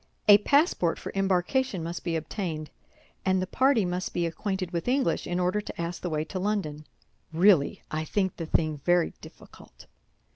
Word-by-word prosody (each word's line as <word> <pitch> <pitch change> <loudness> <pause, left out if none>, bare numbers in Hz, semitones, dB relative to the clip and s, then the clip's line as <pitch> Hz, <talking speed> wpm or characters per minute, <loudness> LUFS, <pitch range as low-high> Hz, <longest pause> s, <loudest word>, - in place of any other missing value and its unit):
A 205 0 +9
passport 280 - +2
for - - -7
embarkation 195 +2 0
must 170 +1 -5
be 170 -2 -1
obtained; 160 -1 -4 0.5
and 190 0 +2
the 185 - -1
party 255 +1 +2
must 180 +1 -3
be 175 - +1
acquainted 185 +2 -3
with 170 +3 -3
English 260 +1 +1
in 175 0 -1
order 180 +4 +1
to - - -9
ask 170 +1 -4
the 180 - -3
way 155 -1 -1
to 185 +4 -5
London. 180 -7 -2 0.4
Really, 170 -3 +3
I 155 0 -1
think 190 +3 -1
the 165 - -5
thing 155 -1 0
very 175 +4 +2
difficult." - - -15
180 Hz, 175 wpm, -27 LUFS, 165-200 Hz, 0.5 s, A